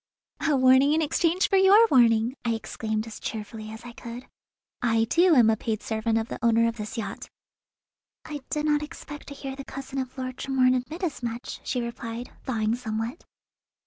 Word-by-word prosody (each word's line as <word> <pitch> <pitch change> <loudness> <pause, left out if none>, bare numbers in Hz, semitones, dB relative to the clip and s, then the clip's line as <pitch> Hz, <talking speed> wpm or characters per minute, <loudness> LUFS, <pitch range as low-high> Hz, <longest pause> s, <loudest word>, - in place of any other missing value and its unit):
"A 310 -3 +2
warning 260 +3 +5
in 320 - +2
exchange 335 +4 +2
for 390 - +3
your 395 +4 +7
warning!" 235 -1 +4
I 230 -2 +1
exclaimed 220 -1 -3
as 225 -2 -9
cheerfully 215 0 -6
as 220 +2 -9
I 240 - -7
could. 235 +1 -9 0.6
"I, 225 -2 +3
too, 335 +9 +4
am 230 -4 +6
a - - +2
paid 220 0 -3
servant 220 0 0
of 225 0 -1
the - - -6
owner 230 0 +4
of 230 0 -3
this 210 +1 -6
yacht." 225 - -5 1.0
"I 295 -2 -6
did 300 0 -1
not 295 -1 +2
expect 295 -1 -9
to 280 - -8
hear 270 -1 -6
the 275 - -7
cousin 270 0 -6
of 260 0 -5
Lord 255 0 -4
Tremorne 260 -2 +3
admit 290 +8 -3
as 325 -7 -2
much," 235 0 -5
she 250 - -1
replied, 235 0 -6
thawing 220 -4 0
somewhat. 225 +3 -4
245 Hz, 190 wpm, -26 LUFS, 225-285 Hz, 1.0 s, your